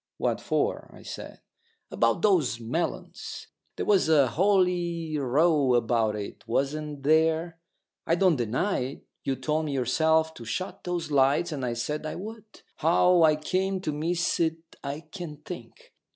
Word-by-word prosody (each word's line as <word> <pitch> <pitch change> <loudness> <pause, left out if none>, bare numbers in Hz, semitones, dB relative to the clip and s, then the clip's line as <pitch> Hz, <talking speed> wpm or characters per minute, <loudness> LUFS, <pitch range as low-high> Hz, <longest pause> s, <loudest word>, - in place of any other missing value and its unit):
"What - - -1
for?" - - -1
I - - -14
said. - - -8 0.5
"About - - +1
those 165 - +3
melons. 125 +10 -4 0.3
There - - -3
was 195 -6 +3
a 145 -5 +5
holy 175 - +1
row 145 0 +3
about 115 -2 +1
it, 105 -1 -7
wasn't 145 +3 -2
there? 160 +2 +2 0.5
I 165 - +3
don't 180 -2 +4
deny 125 - 0
it. 130 +3 -5 0.2
You 135 - 0
told 155 +3 -1
me 145 - -3
yourself 160 +5 +2
to 120 - -10
shut 185 +12 -5
those 175 -3 -3
lights, 140 +5 +3
and 140 -4 -4
I 120 -2 -1
said 150 +6 -3
I - - -4
would. 215 +2 -9 0.2
How 175 +2 +4
I 155 -1 +6
came 190 +5 -1
to 155 - -2
miss 170 +4 -1
it 165 -1 +1 0.3
I 140 +2 -4
can't 160 -4 -9
think. - - -10
155 Hz, 155 wpm, -27 LUFS, 135-175 Hz, 0.5 s, I